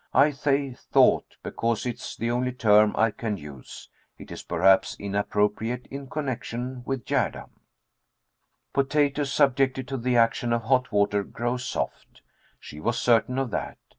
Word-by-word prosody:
I 140 +3 +6
say 140 -1 0
"thought" - - +2
because 115 0 -2
it 120 -2 -3
is - - -7
the 115 +1 -1
only 125 +1 -1
term 105 -3 +4
I 110 0 +3
can 105 -1 -4
use. 75 -6 -11 0.3
It - - -12
is, - - -7
perhaps, 95 +3 +3
inappropriate 105 +4 -1
in 135 -1 -7
connection 125 -3 -4
with 135 -3 -3
Gerda. - - -1 1.2
Potatoes, 140 0 +1
subjected 135 -2 +2
to 135 - -2
the 125 0 0
action 115 +1 +2
of 115 -1 0
hot 125 +2 +1
water, 100 0 +2
grow 120 +5 -3
soft. 125 +1 -5 0.4
She 75 - -11
was 115 +8 -1
certain 120 +2 +2
of 135 -3 -1
that. 90 - -4
120 Hz, 150 wpm, -26 LUFS, 105-135 Hz, 1.2 s, I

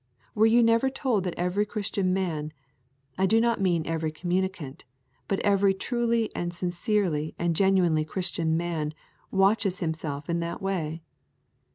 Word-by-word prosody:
Were 220 +1 +4
you 235 +1 +5
never 230 +3 +3
told 255 -7 -1
that 180 - -3
every 180 +4 +1
Christian 205 -3 -1
man, 160 -5 -2 0.7
I 190 - +3
do 225 +3 +4
not 230 -2 +1
mean 175 -4 +1
every 160 -1 -2
communicant, 175 -3 -3 0.4
but 195 - 0
every 200 -1 +3
truly 235 +1 -1
and 175 0 -2
sincerely 175 -3 -1
and 170 -1 0
genuinely 180 -4 +3
Christian 165 -1 -1
man 160 -3 -2 0.3
watches 195 -1 +2
himself 155 -3 -3
in 170 0 0
that 170 0 -4
way? 170 -5 -3
185 Hz, 145 wpm, -27 LUFS, 165-205 Hz, 0.7 s, you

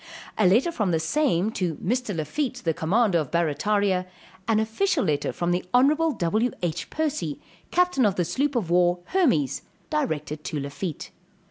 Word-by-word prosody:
A 210 - +3
letter 235 - +3
from 210 - -1
the 165 -2 +1
same 210 - +1
to 175 -7 -2
Mr. 235 - -2
Lafitte, 245 - -3
the 165 - +2
commander 190 +3 +2
of 150 -5 -3
Barrataria; 185 +3 +1 0.4
an 220 -1 +3
official 275 - +1
letter 150 -4 0
from 175 0 -2
the 180 +1 0
honorable 305 +6 +4
W.H. 180 - -1
Percy, 270 - -2 0.3
captain 360 -6 +2
of 195 - 0
the 175 - 0
sloop 275 - -1
of 195 -8 -1
war 175 0 +3
Hermes, 205 - +2 0.3
directed 150 0 -2
to 150 - -3
Lafitte. 145 +4 -5
185 Hz, 155 wpm, -25 LUFS, 165-250 Hz, 0.4 s, honorable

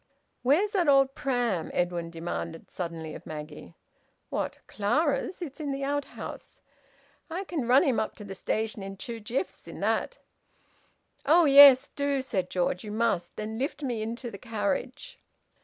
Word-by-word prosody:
"Where's 320 +11 +3
that 370 -6 +1
old 275 -1 +5
pram?" 245 -12 -1
Edwin 175 -1 -1
demanded 165 0 -5
suddenly 165 -3 -5
of - - -10
Maggie. 155 +1 -8 0.5
"What? - - -2
Clara's? 285 - 0
It's 295 -1 -8
in 295 -2 -3
the 275 0 -3
outhouse." 285 0 -5 0.7
"I 350 +4 -3
can 320 -10 -3
run 255 +5 +6
him 270 -8 +2
up 215 - -2
to 210 - -10
the 200 -1 -7
station 215 +2 -2
in 195 0 -7
two 230 +4 -6
jiffs 235 - -4
in - - -9
that." - - 0 1.1
"Oh 320 +4 +5
yes! 280 -2 +9
Do!" 280 -2 0
said 190 -8 -2
George. 180 0 -1
"You 210 - -6
must. 215 -6 -1
And 215 +1 -4
then 220 - -5
lift 290 +2 -3
me 240 -5 -2
into 235 +2 -4
the 200 - -9
carriage!" 255 - -3
240 Hz, 160 wpm, -28 LUFS, 195-280 Hz, 1.1 s, yes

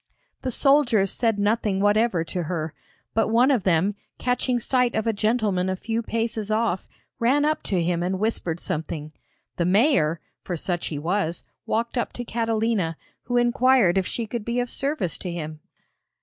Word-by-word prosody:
The 260 - -2
soldiers 250 -7 +3
said 225 -3 +1
nothing 205 -1 +1
whatever 205 -3 +3
to 175 +2 -3
her, 160 -2 -3 0.4
but 225 - +2
one 240 +5 +4
of 245 -8 +2
them, 185 +3 +3 0.2
catching 250 0 0
sight 250 +1 +1
of 220 0 0
a 225 - +1
gentleman 210 -4 +1
a 190 - 0
few 225 +4 -2
paces 225 -2 -2
off, 215 -4 0 0.3
ran 270 +5 +3
up 310 +1 +1
to 180 -4 +1
him 170 0 0
and 185 +2 -1
whispered 185 -5 -1
something. 155 -1 -4 0.5
The 170 - +1
mayor, 180 - +3 0.2
for 175 - -3
such 175 +1 -2
he 150 - -4
was, 170 +2 -1 0.2
walked 235 +3 0
up - - -2
to 245 - -6
Catalina, 225 -7 0 0.3
who 245 0 0
inquired 240 -5 +4
if 190 -1 +1
she 235 - -3
could 225 0 -4
be 235 +3 -1
of 245 -1 -2
service 275 - -1
to 180 - -4
him. 155 -2 -5
215 Hz, 175 wpm, -24 LUFS, 180-235 Hz, 0.5 s, one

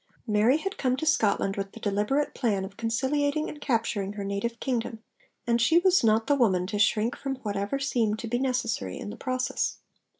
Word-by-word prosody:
Mary 220 +5 +3
had 390 +5 -5
come 255 -1 +1
to 315 - -3
Scotland 205 -9 +2
with 195 -1 -4
the - - -10
deliberate 210 +8 0
plan 205 -7 0
of 195 +1 -11
conciliating 285 +7 0
and 295 - -8
capturing 225 -6 -1
her 205 -1 -5
native 200 +4 -3
kingdom, 230 -3 -3 0.4
and 235 0 +2
she 320 +8 +4
was 370 -2 +4
not 220 0 +3
the 290 - +3
woman 195 -10 +2
to 205 +2 -3
shrink 215 +3 +2
from 270 -1 -4
whatever 205 +3 -2
seemed 235 -6 0
to 230 - -6
be 240 +2 0
necessary 230 - -1
in 205 - -6
the - - -7
process. 255 0 -2
230 Hz, 195 wpm, -27 LUFS, 205-270 Hz, 0.4 s, she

